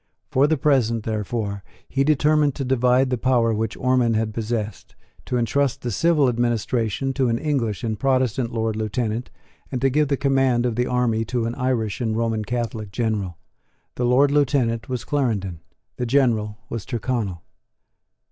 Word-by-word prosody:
For 135 Hz, +3 st, +4 dB
the 160 Hz, 0 st, +1 dB
present, 125 Hz, -7 st, +2 dB
therefore, 105 Hz, -2 st, -3 dB, 0.2 s
he 135 Hz, -, +1 dB
determined 150 Hz, 0 st, +3 dB
to 135 Hz, -, -3 dB
divide 125 Hz, 0 st, +3 dB
the 125 Hz, -, 0 dB
power 120 Hz, -3 st, +2 dB
which 110 Hz, +1 st, -2 dB
Ormond 125 Hz, -3 st, +2 dB
had 110 Hz, 0 st, -1 dB
possessed, 110 Hz, -1 st, -4 dB, 0.3 s
to 125 Hz, -, 0 dB
entrust 130 Hz, +3 st, 0 dB
the 120 Hz, -, -2 dB
civil 155 Hz, -, +3 dB
administration 120 Hz, +1 st, 0 dB
to 130 Hz, -2 st, +1 dB
an 115 Hz, -, +1 dB
English 120 Hz, -, -1 dB
and 110 Hz, -3 st, -2 dB
Protestant 130 Hz, -3 st, +1 dB
Lord 110 Hz, -1 st, -1 dB
Lieutenant, 110 Hz, +2 st, -2 dB, 0.4 s
and 130 Hz, -, -2 dB
to 135 Hz, +1 st, +2 dB
give 150 Hz, +2 st, +2 dB
the 140 Hz, 0 st, 0 dB
command 135 Hz, -3 st, +2 dB
of 120 Hz, -2 st, 0 dB
the 125 Hz, +1 st, 0 dB
army 120 Hz, -3 st, +1 dB
to 120 Hz, 0 st, -1 dB
an 115 Hz, -, -2 dB
Irish 125 Hz, -4 st, -1 dB
and 110 Hz, -2 st, 0 dB
Roman 115 Hz, -2 st, 0 dB
Catholic 115 Hz, -3 st, -3 dB
General. 105 Hz, -7 st, -2 dB, 0.6 s
The 125 Hz, -, -1 dB
Lord 135 Hz, +4 st, +4 dB
Lieutenant 130 Hz, -6 st, +1 dB
was 125 Hz, -2 st, -3 dB
Clarendon; 105 Hz, -, -1 dB, 0.4 s
the 125 Hz, -, -2 dB
General 115 Hz, -5 st, +2 dB
was 115 Hz, -4 st, -5 dB
Tyrconnel. 110 Hz, -7 st, -3 dB
120 Hz, 165 wpm, -23 LUFS, 110-130 Hz, 0.6 s, For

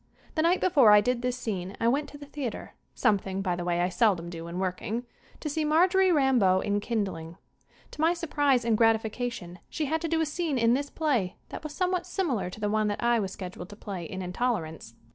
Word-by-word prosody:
The 315 Hz, -, +1 dB
night 345 Hz, +3 st, +3 dB
before 280 Hz, -11 st, +5 dB
I 210 Hz, -, +8 dB
did 245 Hz, +3 st, 0 dB
this 250 Hz, 0 st, -1 dB
scene 195 Hz, -5 st, -4 dB
I 230 Hz, -, +1 dB
went 280 Hz, +5 st, +1 dB
to 290 Hz, -, -11 dB
the 290 Hz, -, -10 dB
theater 280 Hz, -5 st, -6 dB, 0.2 s
something, 195 Hz, -2 st, +1 dB
by 180 Hz, -2 st, 0 dB
the 175 Hz, -, -4 dB
way, 175 Hz, 0 st, 0 dB
I 180 Hz, -, +1 dB
seldom 180 Hz, -3 st, +1 dB
do 165 Hz, -1 st, -7 dB
when 170 Hz, +1 st, -6 dB
working 190 Hz, +6 st, -2 dB, 0.4 s
to -, -, -4 dB
see 310 Hz, +1 st, -1 dB
Marjorie 360 Hz, +5 st, +4 dB
Rambeau 255 Hz, -, +4 dB
in 205 Hz, +1 st, 0 dB
"Kindling." 190 Hz, -7 st, -3 dB, 0.5 s
To -, -, -6 dB
my 330 Hz, +2 st, +3 dB
surprise 290 Hz, -7 st, +1 dB
and 230 Hz, -2 st, +3 dB
gratification 225 Hz, -4 st, 0 dB
she 310 Hz, -, -2 dB
had 320 Hz, +3 st, -1 dB
to 335 Hz, -, -1 dB
do 325 Hz, 0 st, 0 dB
a 320 Hz, -, +2 dB
scene 310 Hz, -2 st, -2 dB
in 230 Hz, 0 st, +4 dB
this 280 Hz, +2 st, -1 dB
play 245 Hz, -, 0 dB
that -, -, -7 dB
was 305 Hz, -1 st, -7 dB
somewhat 365 Hz, -1 st, 0 dB
simi 365 Hz, -3 st, -1 dB
lar 190 Hz, -6 st, -2 dB
to 180 Hz, -, -10 dB
the 210 Hz, -, -1 dB
one 215 Hz, 0 st, +1 dB
that 205 Hz, +2 st, -2 dB
I 235 Hz, -1 st, +3 dB
was 195 Hz, -3 st, -2 dB
scheduled 180 Hz, -1 st, -8 dB
to 205 Hz, -, -10 dB
play 195 Hz, -4 st, -6 dB
in 185 Hz, +3 st, -6 dB
"Intolerance." 180 Hz, -, -3 dB
230 Hz, 225 wpm, -28 LUFS, 190-295 Hz, 0.5 s, I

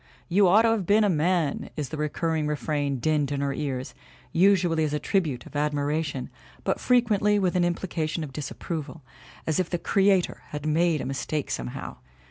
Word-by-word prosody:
"You 190 Hz, +2 st, +5 dB
ought 210 Hz, +5 st, +6 dB
to 230 Hz, -, +4 dB
have 215 Hz, -6 st, 0 dB
been 210 Hz, +2 st, +5 dB
a 205 Hz, -, +3 dB
man," 165 Hz, -2 st, 0 dB
is 145 Hz, -3 st, -3 dB
the 155 Hz, -, -5 dB
recurring 155 Hz, +1 st, -1 dB
refrain 145 Hz, -2 st, -1 dB
dinned 145 Hz, +2 st, +1 dB
in 140 Hz, -1 st, -1 dB
her 140 Hz, -1 st, 0 dB
ears, 135 Hz, -3 st, -3 dB, 0.4 s
usually 175 Hz, -3 st, +3 dB
as 150 Hz, -1 st, -1 dB
a -, -, -1 dB
tribute 155 Hz, -, -1 dB
of -, -, -13 dB
admiration 145 Hz, -1 st, -1 dB, 0.3 s
but -, -, 0 dB
frequently 215 Hz, -4 st, +3 dB
with 185 Hz, -2 st, +1 dB
an 180 Hz, -, +3 dB
implica 175 Hz, -2 st, -1 dB
tion 160 Hz, +1 st, -3 dB
of 140 Hz, -3 st, -8 dB
disapproval, 150 Hz, 0 st, -5 dB, 0.4 s
as 160 Hz, +1 st, 0 dB
if 185 Hz, -, 0 dB
the 175 Hz, -, -1 dB
Creator 195 Hz, 0 st, +2 dB
had 150 Hz, 0 st, -6 dB
made 160 Hz, 0 st, +2 dB
a -, -, -4 dB
mistake 140 Hz, +2 st, -3 dB
somehow. 60 Hz, -1 st, -5 dB
155 Hz, 185 wpm, -26 LUFS, 145-185 Hz, 0.4 s, ought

